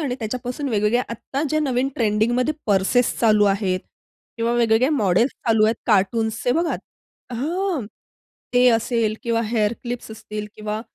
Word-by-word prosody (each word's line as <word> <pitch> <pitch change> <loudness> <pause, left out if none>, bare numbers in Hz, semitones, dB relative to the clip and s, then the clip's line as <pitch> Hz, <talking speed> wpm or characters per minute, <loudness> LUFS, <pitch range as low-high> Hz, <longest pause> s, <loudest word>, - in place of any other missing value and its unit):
आणि 275 -5 -1
त्याच्यापासून 250 +5 -4
वेगवेगळ्या 215 +2 +1
आत्ता 265 +5 -4
ज्या 310 +2 +1
नवीन 265 -2 0
ट्रेंडिंगमध्ये 235 +6 +1
पर्सेस 205 +4 +2
चालू 215 -2 +4
आहेत 185 -3 -1 0.6
किंवा 230 0 0
वेगवेगळ्या 240 +3 +3
मॉडेल्स 225 - +2 0.2
चालू 220 -2 +4
आहेत 220 - +3
कार्टून्सचे 220 +3 +1
बघा. 330 +4 0 0.6
हां, 320 - -2 0.7
ते 250 0 +5
असेल 225 -1 +1
किंवा 230 -1 0
हेअर 215 -2 +2
क्लिप्स 240 -2 -5
असतील 210 -1 -6
किंवा 215 0 -4
230 Hz, 135 wpm, -22 LUFS, 215-250 Hz, 0.7 s, ते